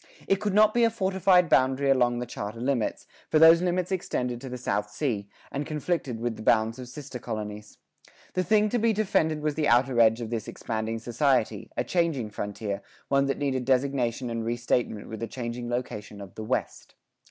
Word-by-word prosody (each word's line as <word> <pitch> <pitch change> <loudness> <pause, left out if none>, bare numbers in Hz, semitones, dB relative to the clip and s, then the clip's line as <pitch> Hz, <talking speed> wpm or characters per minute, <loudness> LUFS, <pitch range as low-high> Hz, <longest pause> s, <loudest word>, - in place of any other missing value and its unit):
It 195 - +3
could 205 0 -2
not 215 0 +6
be 240 - +3
a 230 - +5
fortified 190 -4 +3
boundary 135 0 +3
along 120 -2 +3
the 120 - -3
charter 110 -1 -6
limits, 125 -2 -1 0.2
for - - +3
those 165 +2 +8
limits 180 0 0
extended 125 -9 -2
to 135 - -7
the 125 - -5
South 105 -4 -2
Sea, 105 -4 -2 0.2
and 140 - -2
conflicted 150 -5 -2
with 120 -1 -2
the - - -8
bounds 110 +2 +2
of 125 - -7
sister 135 -1 -8
colonies. 105 -2 -6 0.6
The 185 - +1
thing 210 +2 +3
to 240 - 0
be 225 0 +3
defended 160 -7 +1
was 150 -1 +1
the 150 0 0
outer 120 +1 +3
edge 115 0 +5
of 115 -1 -5
this 115 -3 -3
expanding 110 0 -3
society, 120 -2 0
a - - +1
changing 160 -11 0
frontier, 105 0 -4 0.3
one 140 0 +3
that 135 - -1
needed 135 -3 -1
designation 130 -2 0
and 115 -1 -2
re 120 +1 -1
statement 120 -3 -1
with 110 - -7
the 115 - -3
changing 120 -1 -5
location 105 -4 -4
of 100 -3 -10
the 110 - -7
"West." 110 - -3
125 Hz, 200 wpm, -27 LUFS, 115-155 Hz, 0.6 s, those